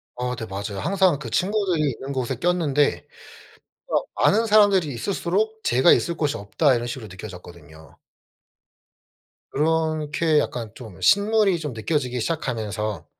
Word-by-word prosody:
어 125 Hz, 0 st, -3 dB
네. 115 Hz, -2 st, -6 dB
맞아요. 100 Hz, 0 st, -5 dB
항상 190 Hz, -, +2 dB
그 130 Hz, -6 st, -7 dB
친구들이 185 Hz, -, +1 dB
있는 135 Hz, +3 st, -7 dB
곳에 130 Hz, -1 st, -2 dB
꼈는데 150 Hz, -2 st, +1 dB, 1.1 s
'아 -, -, +3 dB
아는 225 Hz, +3 st, +3 dB
사람들이 205 Hz, -6 st, +4 dB
있을수록 200 Hz, -, -1 dB
제가 130 Hz, +8 st, +4 dB
있을 170 Hz, -, +2 dB
곳이 150 Hz, -3 st, -1 dB
없다.' 130 Hz, +8 st, +1 dB
이런 120 Hz, 0 st, -2 dB
식으로 120 Hz, -3 st, -6 dB
느껴졌거든요. 85 Hz, -6 st, -12 dB, 1.5 s
그렇게 155 Hz, 0 st, +1 dB
약간 115 Hz, -6 st, -3 dB
좀 110 Hz, -8 st, -11 dB
신물이 205 Hz, -2 st, +3 dB
좀 150 Hz, -5 st, -5 dB
느껴지기 125 Hz, +1 st, -2 dB
시작하면서 110 Hz, -, -3 dB
145 Hz, 310 characters per minute, -23 LUFS, 115-175 Hz, 1.5 s, 사람들이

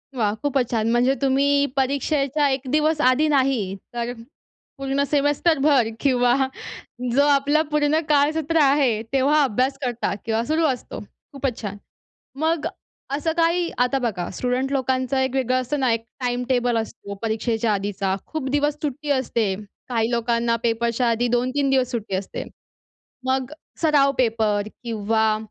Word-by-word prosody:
वाह! 210 Hz, -4 st, +1 dB
खूपच 270 Hz, -4 st, 0 dB
छान! 225 Hz, -1 st, +1 dB
म्हणजे 245 Hz, +3 st, +3 dB
तुम्ही 280 Hz, +1 st, +3 dB
परीक्षेच्या 280 Hz, +1 st, +1 dB
1 265 Hz, -1 st, -1 dB
दिवस 305 Hz, 0 st, +2 dB
आधी 255 Hz, +5 st, +4 dB
नाही, 260 Hz, -9 st, +1 dB, 0.2 s
तर 240 Hz, 0 st, -2 dB, 0.7 s
पूर्ण 275 Hz, +1 st, 0 dB
सेमेस्टरभर 290 Hz, -3 st, +3 dB
किंवा 245 Hz, -3 st, +3 dB, 0.8 s
जो 280 Hz, -, +5 dB
आपलं 285 Hz, +2 st, +3 dB
पूर्ण 300 Hz, +1 st, +2 dB
काळसत्र 305 Hz, +2 st, +2 dB
आहे, 270 Hz, -6 st, +3 dB
तेव्हा 280 Hz, +3 st, +3 dB
अभ्यास 265 Hz, +2 st, 0 dB
करता 245 Hz, -5 st, -1 dB
किंवा 225 Hz, 0 st, 0 dB
सुरू 315 Hz, +2 st, +1 dB
असतो. 255 Hz, -4 st, -4 dB, 0.3 s
खूपच 270 Hz, -3 st, -3 dB
छान! 205 Hz, -2 st, -5 dB, 0.6 s
मग 320 Hz, 0 st, 0 dB, 0.4 s
असं 300 Hz, +4 st, 0 dB
काही 335 Hz, +1 st, +2 dB
आता 250 Hz, +2 st, +2 dB
बघा, 205 Hz, -8 st, -2 dB
स्टुडंट 255 Hz, +4 st, -1 dB
लोकांचं 260 Hz, 0 st, 0 dB
एक 260 Hz, 0 st, 0 dB
वेगळं 255 Hz, -1 st, +1 dB
असतं 255 Hz, +4 st, -3 dB
ना? 260 Hz, -3 st, +2 dB
एक 225 Hz, 0 st, -2 dB, 0.2 s
टाइम 245 Hz, 0 st, -1 dB
टेबल 245 Hz, -2 st, +2 dB
असतो, 220 Hz, -2 st, -5 dB
परीक्षेच्या 225 Hz, 0 st, 0 dB
आधीचा, 195 Hz, -1 st, -1 dB
खूप 310 Hz, -4 st, -4 dB
दिवस 290 Hz, +2 st, +1 dB
सुट्टी 295 Hz, 0 st, -4 dB
असते; 235 Hz, -6 st, 0 dB, 0.4 s
काही 230 Hz, -1 st, 0 dB
लोकांना 235 Hz, 0 st, +1 dB
पेपरच्या 235 Hz, +1 st, +1 dB
आधी 235 Hz, +1 st, +1 dB
2-3 255 Hz, +3 st, 0 dB
दिवस 260 Hz, -2 st, +2 dB
सुट्टी 220 Hz, -5 st, -3 dB
असते. 190 Hz, +1 st, -4 dB, 0.8 s
मग 260 Hz, +1 st, 0 dB, 0.3 s
सराव 290 Hz, -4 st, +4 dB
पेपर 220 Hz, -4 st, +1 dB, 0.2 s
किंवा 220 Hz, -1 st, +1 dB
260 Hz, 140 wpm, -23 LUFS, 230-285 Hz, 0.8 s, जो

